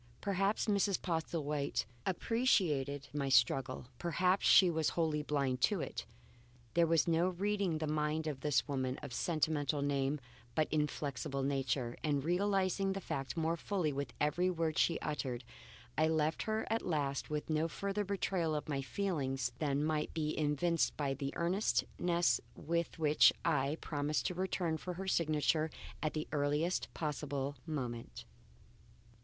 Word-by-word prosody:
Perhaps 200 +1 +1
Mrs. 200 -2 +2
Postlethwaite 155 -4 -1 0.2
appreciated 165 - +1
my 140 -2 -1
struggle; 130 0 +3
perhaps 180 +2 +2
she 185 - +8
was 160 -3 +1
wholly 155 -3 +1
blind 140 -4 0
to 205 +4 +3
it. - - -4 0.7
There 170 0 +4
was 165 0 +3
no 170 +2 +3
reading 195 -2 0
the 155 - -2
mind 155 +1 0
of 150 -4 -3
this 150 +1 +1
woman 130 -2 -1
of 125 - -6
sentimental 150 -2 0
name 140 +1 0 0.4
but 155 - +2
inflexible 140 -3 -1
nature, 135 -3 0
and 145 -3 +1
realizing 195 +2 +1
the 195 - -3
fact 135 -7 -4
more 165 +1 +1
fully 170 -3 -1
with 140 +1 -3
every 175 +5 +2
word 165 -3 0
she 170 - +3
uttered 130 -4 -3 0.5
I 155 +2 +3
left 160 0 +1
her 220 0 -1
at 225 - +1
last 145 -5 -1
with 150 -1 -2
no 155 +1 +1
further 200 +5 -2
betrayal 185 -5 0
of 150 - -3
my 140 -2 -1
feelings 135 -6 -1
than 145 -2 +1
might 155 0 -1
be 155 -2 0
evinced 155 +3 +1
by 140 -2 0
the 140 0 -3
earnestness 175 -1 +1
with 170 +2 -2
which 155 -2 +6
I 145 -1 +1
promised 150 0 -1
to - - 0
return 180 -3 -1
for 180 +2 -5
her 190 +2 -5
signature 155 -2 +2 0.3
at 155 - -1
the 155 - -2
earliest 150 +4 0
possible 145 -2 -2
moment. 125 -7 -4
155 Hz, 150 wpm, -35 LUFS, 145-175 Hz, 0.7 s, she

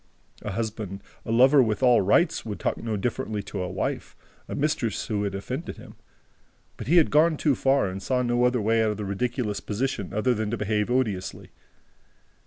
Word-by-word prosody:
A 105 - -5
husband, 105 -2 -4 0.2
a - - -2
lover 130 +4 +6
with 110 +1 0
all 125 -3 +6
rights, 155 - +2
would 105 -3 -6
talk - - -1
no 110 -2 -3
differently 110 -1 -2
to 100 0 -5
a 90 - -3
wife, 95 +1 -3 0.3
a - - -4
mistress 135 -7 -1
who 105 -2 -1
had 100 -1 -3
offended 130 - -5
him. - - -12 0.8
But - - -8
he 170 +5 +4
had 165 - +5
gone 155 +2 +4
too 145 -1 +2
far 135 -3 +2
and 95 +1 -5
saw 125 +4 0
no 120 0 +1
other 125 0 +2
way 115 +2 +2
out 110 - +2
of 105 - -3
the 105 - -4
ridiculous 105 +1 -2
position 105 -2 -3
than 110 -1 0
to 115 - -2
behave 105 0 0
odiously. 110 -7 -2
115 Hz, 195 wpm, -26 LUFS, 105-130 Hz, 0.8 s, lover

